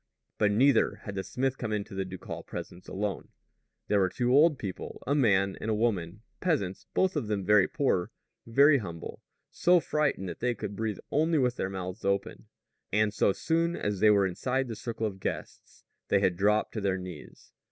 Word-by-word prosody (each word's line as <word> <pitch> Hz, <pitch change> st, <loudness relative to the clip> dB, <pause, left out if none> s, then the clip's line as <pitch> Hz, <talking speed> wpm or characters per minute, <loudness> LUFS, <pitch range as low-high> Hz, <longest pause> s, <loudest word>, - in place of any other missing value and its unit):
But 105 Hz, -, +3 dB
neither 125 Hz, +3 st, +4 dB
had 100 Hz, -, -6 dB
the 95 Hz, -1 st, -3 dB
smith 130 Hz, +3 st, -2 dB
come 115 Hz, -3 st, -3 dB
into 105 Hz, -2 st, -3 dB
the 95 Hz, 0 st, -2 dB
ducal 95 Hz, 0 st, -7 dB
presence 90 Hz, -, -8 dB
alone. 100 Hz, +1 st, -3 dB, 0.6 s
There 105 Hz, -, +3 dB
were 95 Hz, -1 st, +3 dB
two 125 Hz, +5 st, 0 dB
old 150 Hz, +1 st, +5 dB
people 95 Hz, -6 st, -7 dB
a 140 Hz, -, +1 dB
man 100 Hz, -8 st, +3 dB
and 110 Hz, -, -3 dB
a 110 Hz, -, +2 dB
woman, 105 Hz, -3 st, -1 dB, 0.2 s
peasants, 130 Hz, -, -1 dB
both 190 Hz, 0 st, +2 dB
of 110 Hz, -, -1 dB
them 100 Hz, -3 st, -2 dB
very 105 Hz, -2 st, +5 dB
poor, 95 Hz, -11 st, 0 dB, 0.4 s
very 140 Hz, +4 st, +5 dB
humble, 85 Hz, -6 st, -7 dB, 0.3 s
so 180 Hz, 0 st, +4 dB
frightened 150 Hz, -, -1 dB
that -, -, -6 dB
they 125 Hz, 0 st, 0 dB
could 105 Hz, -2 st, -5 dB
breathe 110 Hz, -1 st, -2 dB
only 160 Hz, +2 st, +2 dB
with 125 Hz, -3 st, +1 dB
their 95 Hz, -, -1 dB
mouths 95 Hz, +1 st, -6 dB
open; 100 Hz, 0 st, -2 dB, 0.4 s
and 105 Hz, 0 st, +2 dB
so 100 Hz, -, +3 dB
soon 165 Hz, -, 0 dB
as 105 Hz, -2 st, -2 dB
they 110 Hz, -, +6 dB
were 100 Hz, -2 st, +5 dB
inside 130 Hz, +8 st, -1 dB
the 115 Hz, -, -5 dB
circle 115 Hz, 0 st, -4 dB
of 100 Hz, -3 st, -4 dB
guests, -, -, -6 dB, 0.2 s
they 100 Hz, -, +3 dB
had 95 Hz, -3 st, +2 dB
dropped 105 Hz, +4 st, +2 dB
to 110 Hz, -, -3 dB
their 95 Hz, -1 st, 0 dB
knees. 90 Hz, -4 st, -10 dB
105 Hz, 195 wpm, -29 LUFS, 95-130 Hz, 0.6 s, they